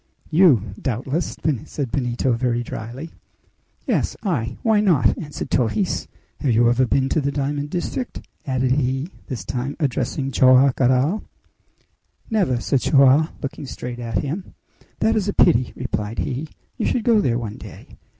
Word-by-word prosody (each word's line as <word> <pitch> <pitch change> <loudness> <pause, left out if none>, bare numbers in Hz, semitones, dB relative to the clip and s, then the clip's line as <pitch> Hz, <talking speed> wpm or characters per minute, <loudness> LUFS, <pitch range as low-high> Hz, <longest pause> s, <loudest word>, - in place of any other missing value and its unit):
"You, 140 - +4
doubtless?" 135 +7 -2 0.3
said 135 -6 -4
Benito 125 0 0
very 120 0 0
dryly. 120 +8 -7 0.7
"Yes - - 0
I? 125 - -1
Why 220 -2 +4
not?" 175 -10 +3
answered 150 -3 -6
Torres. 130 - 0 0.3
"Have 145 - 0
you 120 0 +4
ever 125 +1 +2
been 135 +2 +2
to 155 - +1
the 140 0 -1
diamond 145 +1 -2
district?" 185 - -3 0.3
added 130 -1 +1
he, 135 +4 0 0.2
this 120 - -5
time 130 +6 -3
addressing 135 -1 -1
Joam 130 +1 +5
Garral. 130 - +2 1.1
"Never!" 185 - +1
said 130 +1 0
Joam, 140 +2 +5
looking 140 0 -5
straight 125 -1 -6
at 115 -4 -2
him. 170 +7 -5 0.5
"That 225 - +3
is 210 -3 0
a 205 - 0
pity!" 125 -8 +4
replied 110 -3 -3
he. 140 +3 -2 0.3
"You - - -1
should 240 - 0
go 225 -2 +4
there 120 -10 +1
one 110 -3 -5
day. - - -12
135 Hz, 150 wpm, -22 LUFS, 120-155 Hz, 1.1 s, Joam